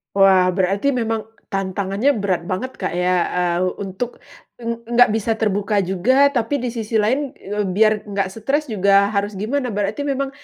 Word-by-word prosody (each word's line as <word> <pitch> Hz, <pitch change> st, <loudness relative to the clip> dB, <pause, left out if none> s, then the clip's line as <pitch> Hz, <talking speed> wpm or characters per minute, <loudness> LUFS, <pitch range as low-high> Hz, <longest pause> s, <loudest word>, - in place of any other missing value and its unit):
Wah, 190 Hz, -2 st, +5 dB
berarti 200 Hz, +8 st, +1 dB
memang 225 Hz, -3 st, -2 dB, 0.2 s
tantangannya 195 Hz, +5 st, 0 dB
berat 195 Hz, -5 st, -1 dB
banget, 250 Hz, +8 st, -3 dB
Kak, 185 Hz, -, -2 dB
ya. 180 Hz, +1 st, +1 dB, 0.2 s
Eee, 175 Hz, -1 st, 0 dB, 0.2 s
untuk 200 Hz, +5 st, -5 dB, 0.4 s
ng 240 Hz, -, -11 dB, 0.2 s
ng 240 Hz, -, -3 dB
nggak 245 Hz, -, +7 dB
bisa 225 Hz, +1 st, -1 dB
terbuka 205 Hz, -1 st, 0 dB
juga, 210 Hz, +10 st, +3 dB
tapi 245 Hz, +3 st, 0 dB
di 250 Hz, -, -1 dB
sisi 225 Hz, -1 st, -4 dB
lain, 260 Hz, +6 st, 0 dB
eee, 210 Hz, +1 st, -4 dB
biar 215 Hz, 0 st, +3 dB
nggak 200 Hz, -1 st, -1 dB
stres 275 Hz, +9 st, -1 dB
juga 200 Hz, 0 st, +3 dB
harus 200 Hz, 0 st, -1 dB
gimana? 250 Hz, +7 st, -1 dB
Berarti 205 Hz, +5 st, -2 dB
memang 275 Hz, 0 st, -1 dB
210 Hz, 165 wpm, -20 LUFS, 195-240 Hz, 0.4 s, nggak